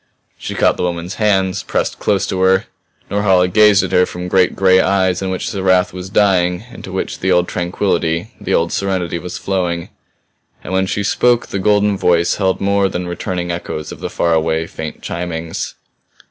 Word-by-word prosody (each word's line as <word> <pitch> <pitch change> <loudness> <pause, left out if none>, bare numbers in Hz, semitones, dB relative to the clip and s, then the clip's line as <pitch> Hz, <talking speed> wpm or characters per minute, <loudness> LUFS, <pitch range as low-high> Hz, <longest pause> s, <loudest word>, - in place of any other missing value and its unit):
She - - -5
caught - - +2
the - - -3
woman's 90 +1 -3
hands, 95 -3 +2
pressed - - -2
close 100 -1 +1
to 95 - -3
her. 95 +1 +3 0.5
Norhala 95 -3 +3
gazed 105 +1 +5
at - - -3
her 90 0 +4
from 90 0 -6
great 90 -1 +3
gray 95 -1 +4
eyes 95 -2 +2
in 95 - -2
which 95 - -3
the 100 -4 -4
wrath 95 0 +2
was 90 0 -7
dying, 95 -2 +2
into 95 - -9
which 95 - -3
the 95 - 0
old 90 0 +3
tranquillity, 85 +1 -1
the - - -4
old 85 +1 +1
serenity 95 -3 -1
was 90 +1 -6
flowing. 90 -3 -2 0.7
And - - -6
when 95 0 +1
she 100 - -2
spoke 120 +4 +2
the 100 - -4
golden 105 0 +2
voice 85 -1 +2
held 95 -2 0
more 100 0 +2
than 90 0 -4
returning 90 0 -3
echoes 80 -3 -5
of - - -9
the - - -4
far 85 -1 0
away, 80 0 +1
faint 80 -1 -7
chimings. 85 -1 -4
95 Hz, 190 wpm, -17 LUFS, 85-95 Hz, 0.7 s, gazed